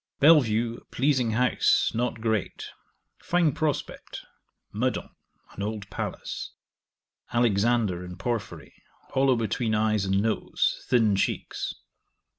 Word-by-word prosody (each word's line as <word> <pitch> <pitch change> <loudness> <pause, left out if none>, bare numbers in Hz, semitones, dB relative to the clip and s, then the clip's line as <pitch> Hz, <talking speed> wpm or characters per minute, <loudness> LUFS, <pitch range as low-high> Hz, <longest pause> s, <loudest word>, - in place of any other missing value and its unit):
Bellevue, 120 -7 +4
a - - -29
pleasing 130 -4 +1
house, 125 +3 +3
not 120 0 -1
great: 110 -3 -1 0.5
fine 175 -3 +2
prospect. 150 0 -3 0.5
Meudon, 125 +5 -1 0.4
an - - -8
old 105 -1 -4
palace. - - -5 0.8
Alexander, 115 -4 +2
in 90 0 -8
Porphyry: 115 -2 -4 0.4
hollow 135 -1 +3
between 115 0 -1
eyes 110 -1 +1
and 95 0 +1
nose, 110 +1 0
thin 110 -5 +3
cheeks. 95 - -2
115 Hz, 105 wpm, -26 LUFS, 105-125 Hz, 0.8 s, Bellevue